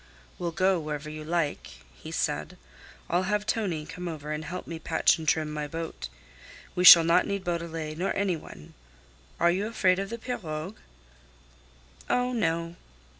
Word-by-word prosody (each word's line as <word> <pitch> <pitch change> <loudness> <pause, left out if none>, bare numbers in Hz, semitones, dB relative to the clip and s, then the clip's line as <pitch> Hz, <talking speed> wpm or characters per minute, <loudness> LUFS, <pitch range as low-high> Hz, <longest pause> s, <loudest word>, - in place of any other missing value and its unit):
"We'll 175 - -1
go 185 +1 +2
wherever 150 -1 -5
you 155 0 -7
like," 165 -2 -2 0.2
he 65 - -11
said. 75 +1 -2 0.5
"I'll 185 +2 0
have 210 0 0
Tonie 200 -9 -1
come 180 +3 -7
over 155 -2 -6
and 155 0 -3
help 180 +3 -6
me 165 -1 -6
patch 165 +1 +2
and 160 - -7
trim 155 -1 +1
my 150 -1 -3
boat. 160 - -6 0.6
We 180 - 0
shall 170 -2 +11
not 170 +1 +3
need 200 -1 -2
Beaudelet 165 -3 -4
nor 190 - 0
any 195 -3 +1
one. 75 - -12 0.7
Are 170 - +4
you 195 +4 -1
afraid 190 -5 +2
of 195 0 -3
the 230 - -4
pirogue?" 185 -7 -5 1.3
"Oh, 250 0 +1
no." 170 -6 -1
170 Hz, 165 wpm, -27 LUFS, 155-190 Hz, 1.3 s, shall